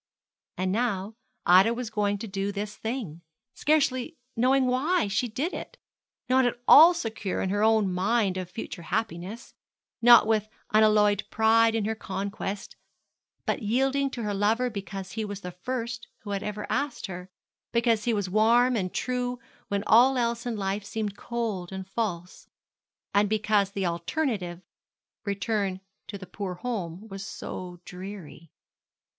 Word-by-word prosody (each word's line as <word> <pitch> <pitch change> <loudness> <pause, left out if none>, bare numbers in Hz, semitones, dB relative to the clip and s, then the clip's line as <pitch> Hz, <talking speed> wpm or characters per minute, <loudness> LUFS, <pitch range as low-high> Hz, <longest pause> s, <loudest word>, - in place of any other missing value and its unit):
And 185 0 0
now 210 -2 -1 0.3
Ida 190 +6 +6
was 240 -2 -5
going 205 -2 0
to 225 - -6
do 195 0 -2
this 205 +1 -5
thing, 220 - -5 0.3
scarcely 295 0 +1 0.2
knowing 260 +3 +3
why 265 - +1
she 200 +5 0
did 280 - -3
it, - - -7 0.5
not 260 +1 +4
at 245 -1 0
all 335 +4 +9
secure 220 - -3
in 190 - -1
her 205 +1 0
own 215 -3 +3
mind 195 +1 +1
of 185 -2 -4
future 180 -2 -7
happiness; 205 +3 -4 0.5
not 240 -1 +8
with 215 -1 +1 0.2
unalloyed 210 -1 +4
pride 225 0 +4
in 220 -2 0
her 220 - 0
conquest, 200 0 -5 0.7
but - - -1
yielding 270 +5 +1
to 240 -3 -5
her 210 -1 -1
lover 220 +5 +1
because 195 -2 -6
he 220 +3 -3
was 205 -1 -6
the 180 - -6
first 235 +5 -4
who 205 - -7
had 200 -1 -1
ever 210 0 -4
asked 265 +3 -2
her; 180 -1 -7 0.4
because 230 -2 +2
he 240 - +2
was 205 -2 -1
warm 230 +5 +4
and 185 -5 -2
true 250 0 -1 0.3
when 200 0 -1
all 255 +4 +6
else 235 0 -1
in 235 - -2
life 195 0 -2
seemed 210 -1 -4
cold 215 -7 -3
and 190 -1 -6
false; 185 -4 -4 0.7
and 205 0 +3
because 210 -2 +2
the 200 -1 -3
alternative 180 - -2 0.6
return 200 -1 -1 0.3
to 205 - -6
the 190 - -9
poor 185 0 -5
home 195 -2 -5
was 195 -2 -7
so 180 -2 -7
dreary. 180 -4 -9
210 Hz, 155 wpm, -27 LUFS, 195-235 Hz, 0.7 s, all